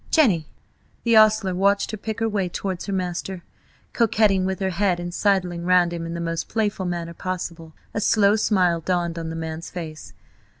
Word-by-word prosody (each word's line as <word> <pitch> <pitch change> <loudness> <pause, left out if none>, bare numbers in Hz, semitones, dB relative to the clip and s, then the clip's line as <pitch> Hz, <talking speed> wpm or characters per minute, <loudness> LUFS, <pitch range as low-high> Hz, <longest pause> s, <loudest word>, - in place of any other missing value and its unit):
Jenny!" 200 - +3 0.6
The 230 -1 +3
ostler 215 -3 +5
watched 200 +2 +2
her - - -3
pick 220 +2 -5
her 225 - +2
way 200 -4 -1
towards 185 +1 -4
her - - -2
master, 185 -1 -3 0.5
coquetting 210 -5 +3
with 190 0 -2
her 190 -1 0
head, 185 -1 +1
and 175 0 -5
sidling 180 -4 +1
round 180 -1 +3
him 165 -1 -4
in 165 - -5
the - - -4
most 165 -1 -3
playful 205 -4 -1
manner 170 -1 -3
possible. 170 -3 -5 0.2
A 210 - -1
slow 205 -1 +4
smile 180 -6 +2
dawned 175 -1 -1
on 165 -1 -4
the 165 - -5
man's 160 +1 -5
face. 160 -3 -8
185 Hz, 185 wpm, -23 LUFS, 170-205 Hz, 0.6 s, ostler